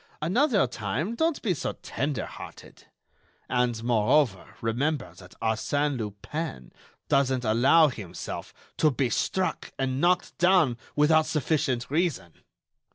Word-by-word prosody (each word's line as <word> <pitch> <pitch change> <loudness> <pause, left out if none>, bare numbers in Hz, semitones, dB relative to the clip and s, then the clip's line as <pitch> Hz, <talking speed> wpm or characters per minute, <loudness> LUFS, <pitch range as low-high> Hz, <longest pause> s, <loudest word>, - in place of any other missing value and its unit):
Another 210 - +2
time, 125 - -3
don't 320 +5 0
be 200 -6 +2
so 155 - -3
tender 135 -4 -2
hearted. - - -11 0.6
And, 125 -2 0
moreover, 115 -1 +2
remember 125 - -1
that 90 -1 -14
Arsène 140 +6 0
Lupin 105 - -5 0.4
doesn't 130 -2 +2
allow 130 +9 +5
himself 95 -8 -7 0.3
to 155 - +4
be 130 -3 -1
struck 190 -1 -1
and 135 0 -1
knocked 180 +1 +2
down 175 -9 +4 0.2
without 155 +1 +4
sufficient 140 -5 -1
reason. 150 - -1
135 Hz, 115 wpm, -27 LUFS, 115-160 Hz, 0.6 s, allow